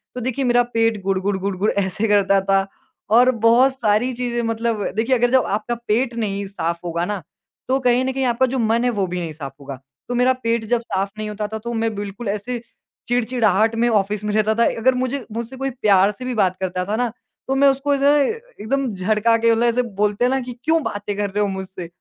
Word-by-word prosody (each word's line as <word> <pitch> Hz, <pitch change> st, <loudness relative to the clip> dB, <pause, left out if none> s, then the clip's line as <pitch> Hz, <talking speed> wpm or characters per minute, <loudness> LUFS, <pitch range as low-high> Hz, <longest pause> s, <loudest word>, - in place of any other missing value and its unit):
तो 250 Hz, -, -4 dB
देखिए 260 Hz, +2 st, -1 dB
मेरा 245 Hz, 0 st, +4 dB
पेट 225 Hz, -2 st, +1 dB
गुड़-गुड़ 195 Hz, 0 st, 0 dB
गुड़-गुड़ 195 Hz, +1 st, -1 dB
ऐसे 200 Hz, +4 st, -1 dB
करता 195 Hz, -1 st, +3 dB
था। 195 Hz, 0 st, +1 dB, 0.5 s
और 250 Hz, +1 st, +6 dB
बहुत 260 Hz, +3 st, +5 dB
सारी 220 Hz, +2 st, +2 dB
चीज़ें 240 Hz, -1 st, -2 dB
मतलब 225 Hz, -2 st, -1 dB
देखिए 230 Hz, +4 st, +2 dB
अगर 245 Hz, +1 st, +2 dB
जब 260 Hz, -1 st, +4 dB
आपका 215 Hz, +4 st, -2 dB
पेट 235 Hz, +3 st, +1 dB
नहीं 200 Hz, -3 st, -2 dB
साफ 170 Hz, -4 st, -3 dB
होगा 170 Hz, 0 st, -1 dB
ना 205 Hz, -1 st, -3 dB, 0.5 s
तो 265 Hz, +1 st, +2 dB
कहीं 250 Hz, 0 st, +2 dB
न 265 Hz, -, 0 dB
कहीं 265 Hz, 0 st, -1 dB
आपका 245 Hz, +2 st, +2 dB
जो 260 Hz, -, 0 dB
मन 230 Hz, +1 st, +2 dB
है 250 Hz, -, +2 dB
वो 205 Hz, -5 st, 0 dB
भी 180 Hz, 0 st, -3 dB
नहीं 165 Hz, -2 st, -4 dB
साफ 140 Hz, -3 st, -8 dB
होगा। 140 Hz, -2 st, -8 dB, 0.3 s
तो 245 Hz, -, -1 dB
मेरा 250 Hz, +1 st, +4 dB
पेट 230 Hz, -1 st, 0 dB
जब 235 Hz, +1 st, +1 dB
साफ 195 Hz, -3 st, -2 dB
नहीं 215 Hz, 0 st, -4 dB
होता 210 Hz, 0 st, -4 dB
था -, -, -1 dB
तो 235 Hz, +2 st, -5 dB
मैं 225 Hz, -1 st, -1 dB
बिल्कुल 205 Hz, +2 st, -6 dB
ऐसे 220 Hz, +4 st, -3 dB, 0.5 s
चिड़चिड़ाहट 225 Hz, -3 st, +2 dB
में 235 Hz, +1 st, +2 dB
ऑफ़िस 205 Hz, -1 st, 0 dB
में 210 Hz, 0 st, -2 dB
रहता 215 Hz, 0 st, +2 dB
था। 235 Hz, +1 st, +3 dB
अगर 255 Hz, +3 st, +4 dB
मुझे 255 Hz, 0 st, -2 dB
मुझसे 235 Hz, +3 st, -5 dB
कोई 270 Hz, +1 st, -2 dB
प्यार 205 Hz, -5 st, +3 dB
से 255 Hz, -, -6 dB
भी 255 Hz, -, -2 dB
बात 190 Hz, -4 st, +2 dB
करता 180 Hz, -1 st, -2 dB
था 210 Hz, +3 st, -2 dB
ना, 245 Hz, 0 st, 0 dB, 0.4 s
तो 270 Hz, -, 0 dB
मैं 280 Hz, +1 st, +5 dB
उसको 275 Hz, +1 st, 0 dB
ऐसे 280 Hz, 0 st, +3 dB, 0.3 s
एकदम 270 Hz, -1 st, -1 dB
झड़का 215 Hz, +4 st, +2 dB
के 230 Hz, 0 st, +3 dB
मतलब 230 Hz, +1 st, +2 dB
ऐसे 235 Hz, +1 st, +2 dB, 0.2 s
बोलते 210 Hz, +3 st, +2 dB
हैं -, -, +3 dB
ना 265 Hz, -, +1 dB
कि 250 Hz, 0 st, -6 dB
क्यों 320 Hz, +1 st, +2 dB
बातें 205 Hz, 0 st, -4 dB
कर 205 Hz, -1 st, -1 dB
रहे 205 Hz, +2 st, -1 dB
हो 205 Hz, -, +2 dB
मुझसे? 190 Hz, -2 st, -6 dB
225 Hz, 230 wpm, -21 LUFS, 200-245 Hz, 0.5 s, और